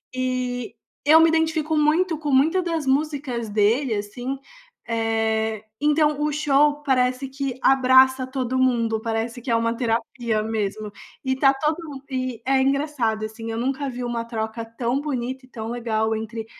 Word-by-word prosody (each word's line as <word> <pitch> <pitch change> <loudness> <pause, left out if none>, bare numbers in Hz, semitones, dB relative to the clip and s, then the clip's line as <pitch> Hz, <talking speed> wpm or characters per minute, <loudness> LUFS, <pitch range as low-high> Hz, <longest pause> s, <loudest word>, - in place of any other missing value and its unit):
E 255 -1 -2 0.3
eu 310 +3 +7
me 325 - +6
identifico 320 -1 +1
muito 315 +3 +2
com 295 -2 -2
muita 315 +8 +4
das 330 -4 -2
músicas 270 -5 -1
dele, 220 +4 +2
assim. 245 +6 -4 0.5
Eh, 220 -1 0 0.2
então, 300 0 +2
o 300 0 +1
show 295 0 +2
parece 255 0 +1
que 270 -1 -4
abraça 260 0 +5
todo 260 -1 -2
mundo, 230 -4 +1
parece 230 +2 -3
que 245 - -7
é 230 - +3
uma 230 0 +1
terapia 230 -2 -1
mesmo, 215 -1 -3 0.3
e 260 0 0
tá 270 0 +5
todo 305 +4 0
mundo 270 -1 -9
e 255 -3 -3
é 265 0 +3
engraçado 270 -6 0
assim, 225 +1 -7
eu 225 - -3
nunca 270 +3 -1
vi 245 0 -5
uma 235 -1 -2
troca 225 0 -4
tão 235 +4 -2
bonita 260 -2 -3
e - - -25
tão 225 -1 -6
legal 220 -2 -1
entre 220 0 -5
255 Hz, 165 wpm, -23 LUFS, 225-280 Hz, 0.5 s, eu